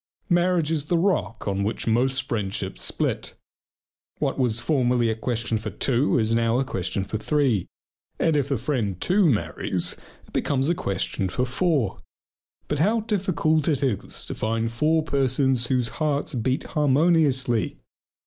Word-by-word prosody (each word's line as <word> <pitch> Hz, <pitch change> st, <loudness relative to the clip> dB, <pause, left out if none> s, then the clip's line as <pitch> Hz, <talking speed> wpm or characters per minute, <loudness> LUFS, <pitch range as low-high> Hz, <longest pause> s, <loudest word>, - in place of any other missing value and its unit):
Marriage 175 Hz, -2 st, +2 dB
is 150 Hz, -3 st, -1 dB
the 170 Hz, +3 st, +1 dB
rock 165 Hz, -, 0 dB
on 100 Hz, 0 st, 0 dB
which 105 Hz, +3 st, -2 dB
most 130 Hz, +3 st, +1 dB
friendships 100 Hz, -4 st, -3 dB
split. -, -, -2 dB, 0.8 s
What -, -, -1 dB
was 120 Hz, -3 st, +2 dB
formerly 125 Hz, -5 st, +2 dB
a -, -, -2 dB
question 115 Hz, -1 st, -1 dB
for 110 Hz, 0 st, -5 dB
two 130 Hz, +7 st, +1 dB
is 110 Hz, -1 st, +1 dB
now 115 Hz, 0 st, +2 dB
a 135 Hz, -, +1 dB
question 95 Hz, -5 st, -2 dB
for 110 Hz, +2 st, -4 dB
three. 130 Hz, -, +1 dB, 0.5 s
And 160 Hz, -2 st, +2 dB
if 140 Hz, -2 st, +1 dB
the 140 Hz, -, +1 dB
friend 115 Hz, -, -2 dB
too 185 Hz, -, +3 dB
marries 85 Hz, -, 0 dB, 0.3 s
it -, -, -21 dB
becomes 135 Hz, +1 st, +1 dB
a -, -, +4 dB
question 95 Hz, -, -2 dB
for 125 Hz, +7 st, -1 dB
four. 135 Hz, -, 0 dB, 0.7 s
But 150 Hz, -, -2 dB
how 215 Hz, +8 st, +2 dB
difficult 175 Hz, -8 st, 0 dB
it 145 Hz, -4 st, +1 dB
is 125 Hz, -8 st, -2 dB
to -, -, -5 dB
find 115 Hz, +1 st, -1 dB
four 155 Hz, +7 st, +2 dB
persons 135 Hz, -3 st, +1 dB
whose 125 Hz, -2 st, +1 dB
hearts 150 Hz, -2 st, -1 dB
beat 130 Hz, +2 st, -1 dB
harmoniously! 145 Hz, -5 st, +2 dB
130 Hz, 155 wpm, -24 LUFS, 115-155 Hz, 0.8 s, a